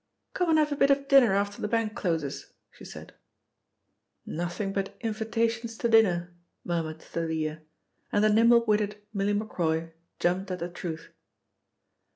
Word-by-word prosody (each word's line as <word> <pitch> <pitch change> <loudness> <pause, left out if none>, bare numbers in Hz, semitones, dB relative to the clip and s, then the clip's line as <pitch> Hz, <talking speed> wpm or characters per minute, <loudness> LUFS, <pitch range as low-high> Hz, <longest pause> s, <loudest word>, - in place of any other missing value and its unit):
"Come 360 -2 0
and 320 - +4
have 300 -1 +2
a - - 0
bit 280 0 +3
of 275 0 +2
dinner 265 -8 +6
after 200 0 -1
the - - -1
bank 225 -1 0
closes," 165 -9 -3 0.2
she - - -16
said. - - -10 1.1
"Nothing 175 +4 -3
but 195 -1 -3
invitations 225 +1 -2
to 235 - 0
dinner," 180 -6 +3 0.3
murmured 160 -2 -3
Thalia 160 -2 -3 0.5
and 205 - +2
the 215 - +5
nimble 230 +1 +5
witted 210 -1 0
Milly 200 0 0
Macroy 165 -6 -1 0.3
jumped 185 +2 0
at 185 - -3
the 175 0 -4
truth. 170 -2 -6
205 Hz, 150 wpm, -28 LUFS, 175-230 Hz, 1.1 s, dinner